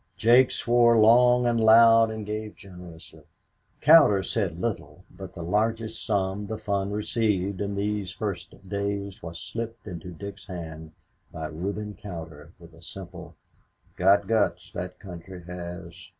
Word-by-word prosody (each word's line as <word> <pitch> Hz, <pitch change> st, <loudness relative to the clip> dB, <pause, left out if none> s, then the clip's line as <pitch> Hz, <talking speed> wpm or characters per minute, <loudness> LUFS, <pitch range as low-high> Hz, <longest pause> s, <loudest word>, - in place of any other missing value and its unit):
Jake 120 Hz, +5 st, +5 dB
swore 120 Hz, -1 st, +3 dB
long 125 Hz, +3 st, +5 dB
and 120 Hz, -1 st, +1 dB
loud 115 Hz, 0 st, +7 dB
and 110 Hz, -1 st, -6 dB
gave 105 Hz, 0 st, -5 dB
generously. 90 Hz, -4 st, -13 dB, 0.6 s
Cowder 145 Hz, -12 st, +6 dB
said 95 Hz, -7 st, -2 dB
little, 90 Hz, -6 st, -4 dB
but 95 Hz, 0 st, -11 dB
the 85 Hz, -, -6 dB
largest 110 Hz, +4 st, -1 dB
sum 100 Hz, -1 st, -1 dB
the 110 Hz, -, -4 dB
fund 100 Hz, -2 st, -2 dB
received 105 Hz, -3 st, -1 dB
in 100 Hz, 0 st, -3 dB
these 100 Hz, -1 st, -2 dB
first 100 Hz, 0 st, -6 dB
days 100 Hz, 0 st, -4 dB
was 85 Hz, 0 st, -8 dB
slipped 115 Hz, 0 st, -6 dB
into 90 Hz, -3 st, -8 dB
Dick's 100 Hz, +3 st, -9 dB
hand 80 Hz, -4 st, -8 dB, 0.4 s
by 80 Hz, -, -6 dB
Reuben 100 Hz, +7 st, -5 dB
Cowder 80 Hz, -5 st, -9 dB
with 85 Hz, -2 st, -16 dB
a 80 Hz, -, -17 dB
simple, 90 Hz, 0 st, -10 dB, 0.6 s
"Got 100 Hz, +2 st, +4 dB
guts 95 Hz, -4 st, 0 dB
that 90 Hz, 0 st, -6 dB
country 90 Hz, -1 st, -10 dB
has." 90 Hz, 0 st, -9 dB
100 Hz, 140 wpm, -26 LUFS, 90-110 Hz, 0.6 s, loud